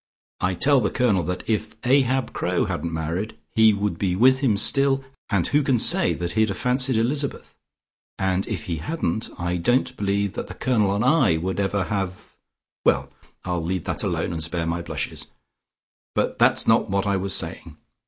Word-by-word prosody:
I 95 Hz, 0 st, 0 dB
tell 140 Hz, +8 st, +3 dB
the 105 Hz, -, +1 dB
Colonel 115 Hz, -7 st, +2 dB
that 90 Hz, +2 st, -3 dB
if 110 Hz, -1 st, -2 dB
Ahab 130 Hz, 0 st, +2 dB
Crowe -, -, 0 dB
hadn't 85 Hz, +3 st, -3 dB
married, 80 Hz, +6 st, -3 dB, 0.2 s
he 110 Hz, -1 st, +6 dB
would 100 Hz, -4 st, -2 dB
be 90 Hz, -3 st, 0 dB
with 130 Hz, +6 st, +5 dB
him 125 Hz, -7 st, +2 dB
still, 135 Hz, +4 st, +3 dB, 0.3 s
and 95 Hz, -4 st, +1 dB
who 145 Hz, -, +2 dB
can 135 Hz, -3 st, +2 dB
say -, -, +3 dB
that 85 Hz, 0 st, -3 dB
he'd 110 Hz, +4 st, +2 dB
have 100 Hz, -, -3 dB
fancied 125 Hz, +1 st, +1 dB
Elizabeth? 135 Hz, +5 st, -1 dB, 0.6 s
And 95 Hz, 0 st, 0 dB
if -, -, -4 dB
he 85 Hz, -2 st, -3 dB
hadn't, 110 Hz, -, -2 dB
I 85 Hz, +1 st, -2 dB
don't 120 Hz, +8 st, +1 dB
believe 100 Hz, -1 st, -1 dB
that -, -, -5 dB
the -, -, -9 dB
Colonel 105 Hz, -6 st, +1 dB
and 105 Hz, +4 st, 0 dB
I 130 Hz, -, +4 dB
would 95 Hz, +4 st, -3 dB
ever 100 Hz, 0 st, 0 dB
have 95 Hz, -2 st, -3 dB, 0.6 s
well, -, -, +2 dB, 0.4 s
I'll 90 Hz, -2 st, -1 dB
leave 90 Hz, +1 st, -2 dB
that -, -, -3 dB
alone, -, -, -2 dB
and 80 Hz, -, -4 dB
spare 85 Hz, +1 st, -2 dB
my 85 Hz, +1 st, -2 dB
blushes. 85 Hz, -, -5 dB, 0.9 s
But -, -, -1 dB
that's -, -, +4 dB
not 115 Hz, -1 st, +3 dB
what 100 Hz, +1 st, 0 dB
I 100 Hz, -1 st, +1 dB
was 95 Hz, +1 st, -1 dB
saying. -, -, -3 dB
100 Hz, 185 wpm, -23 LUFS, 90-125 Hz, 0.9 s, he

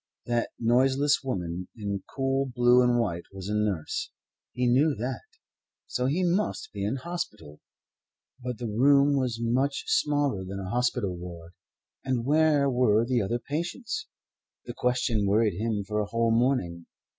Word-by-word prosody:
That 120 Hz, -1 st, 0 dB
noiseless 135 Hz, +5 st, +3 dB
woman 90 Hz, -8 st, -3 dB
in 100 Hz, -2 st, -3 dB
coot 135 Hz, -1 st, 0 dB
blue 120 Hz, 0 st, +5 dB
and 125 Hz, -1 st, +3 dB
white 85 Hz, -7 st, -2 dB
was 95 Hz, 0 st, -7 dB
a -, -, -1 dB
nurse. 105 Hz, -7 st, -1 dB, 0.4 s
He 125 Hz, -, -1 dB
knew 140 Hz, +5 st, +3 dB
that. 125 Hz, +5 st, -4 dB, 0.6 s
So 125 Hz, 0 st, -1 dB
he 165 Hz, +7 st, +1 dB
must 180 Hz, +4 st, -1 dB
be 100 Hz, -1 st, -4 dB
in 105 Hz, +5 st, 0 dB
hospital. 130 Hz, -, -6 dB, 0.8 s
But 125 Hz, -2 st, -4 dB
the 125 Hz, -, -5 dB
room 140 Hz, +6 st, +4 dB
was 125 Hz, -4 st, 0 dB
much 125 Hz, -, 0 dB
smaller 145 Hz, -, +1 dB
than 95 Hz, +1 st, -6 dB
a 95 Hz, 0 st, -5 dB
hospital 120 Hz, -6 st, 0 dB
ward; 85 Hz, -1 st, -9 dB, 0.5 s
and 125 Hz, -3 st, -1 dB
where 150 Hz, -1 st, +3 dB
were 120 Hz, -4 st, +3 dB
the 125 Hz, -1 st, +1 dB
other 115 Hz, +4 st, -1 dB
patients? 175 Hz, -, -4 dB, 0.6 s
The -, -, -6 dB
question 120 Hz, -4 st, 0 dB
worried 105 Hz, 0 st, +3 dB
him 110 Hz, -2 st, -1 dB
for 105 Hz, +2 st, -2 dB
a 105 Hz, -, -1 dB
whole 115 Hz, +1 st, +1 dB
morning. 115 Hz, -9 st, 0 dB
120 Hz, 155 wpm, -27 LUFS, 105-135 Hz, 0.8 s, blue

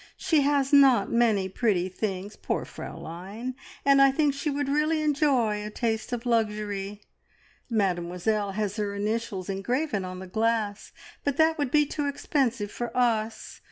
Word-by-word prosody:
She 315 Hz, -3 st, +2 dB
has 280 Hz, 0 st, +1 dB
not 275 Hz, -3 st, +6 dB
many 220 Hz, -5 st, +3 dB
pretty 190 Hz, -2 st, 0 dB
things 195 Hz, +1 st, -4 dB
poor -, -, -2 dB
Fraulein! 195 Hz, +10 st, -7 dB, 0.3 s
and 275 Hz, 0 st, +6 dB
I 275 Hz, -, +7 dB
think 290 Hz, 0 st, +2 dB
she 280 Hz, +2 st, -2 dB
would 285 Hz, -1 st, -1 dB
really 305 Hz, +3 st, +1 dB
enjoy 270 Hz, -8 st, +2 dB
a 210 Hz, -, -5 dB
taste 220 Hz, +1 st, -2 dB
of 245 Hz, 0 st, -3 dB
luxury. 210 Hz, -3 st, -1 dB, 0.7 s
Mademoiselle 195 Hz, 0 st, 0 dB
has 210 Hz, 0 st, -2 dB
her 205 Hz, -1 st, -2 dB
initials 210 Hz, -2 st, -2 dB
engraven 210 Hz, +3 st, -1 dB
on 185 Hz, 0 st, -6 dB
the 190 Hz, -, -7 dB
glass, 220 Hz, +1 st, -1 dB, 0.3 s
but 285 Hz, -1 st, -1 dB
that 320 Hz, 0 st, +3 dB
would 285 Hz, -3 st, 0 dB
be 295 Hz, +2 st, +4 dB
too 290 Hz, 0 st, -3 dB
expensive 260 Hz, -7 st, -1 dB
for 240 Hz, -1 st, -4 dB
us. 225 Hz, -3 st, 0 dB
225 Hz, 155 wpm, -27 LUFS, 205-275 Hz, 0.7 s, I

